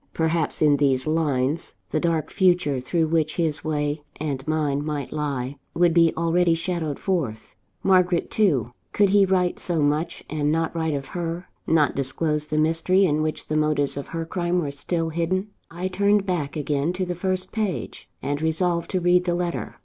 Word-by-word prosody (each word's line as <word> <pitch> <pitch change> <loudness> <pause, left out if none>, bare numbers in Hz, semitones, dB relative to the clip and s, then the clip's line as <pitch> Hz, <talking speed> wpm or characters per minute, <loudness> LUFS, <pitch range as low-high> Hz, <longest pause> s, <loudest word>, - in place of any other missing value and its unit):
Perhaps, 160 -1 0
in 145 -1 +5
these 135 -2 +2
lines, 155 -1 0
the 155 - 0
dark 165 -2 0
future 175 -8 +2
through 160 +6 0
which 155 -1 0
his 160 -3 0
way 150 -1 -1 0.2
and 140 -2 -3
mine 150 -2 0
might 150 -3 -3
lie, 140 -3 -3 0.2
would 175 -1 +4
be 165 -1 +5
already 170 +1 +3
shadowed 165 -3 -2
forth. 145 - -2 0.3
Margaret 180 -2 +3
too! 150 - +2 0.2
Could 205 -1 +4
he 200 -1 +6
write 180 -1 +1
so 170 -3 -1
much, 150 +3 0
and 150 -1 0
not 165 +1 0
write 160 -2 0
of 135 -1 -5
her? 175 0 -4 0.2
not 155 -4 +3
disclose 150 +3 -1
the 155 - -2
mystery 165 +5 +3
in 150 -3 +1
which 155 0 -2
the 155 - -3
motives 150 -2 +1
of 140 - -5
her 165 -1 -4
crime 175 +1 -1
were 150 -5 -1
still 165 +4 -2
hidden? 175 +5 -1 0.2
I 175 +2 -3
turned 200 +2 +2
back 170 -7 -2
again 150 +2 0
to 185 0 -2
the 180 - -2
first 185 +1 -2
page, 210 -6 -3
and 145 +2 -2
resolved 170 +1 0
to 185 - 0
read 180 0 +3
the 175 -1 +1
letter. 175 -1 -3
160 Hz, 180 wpm, -24 LUFS, 150-175 Hz, 0.3 s, he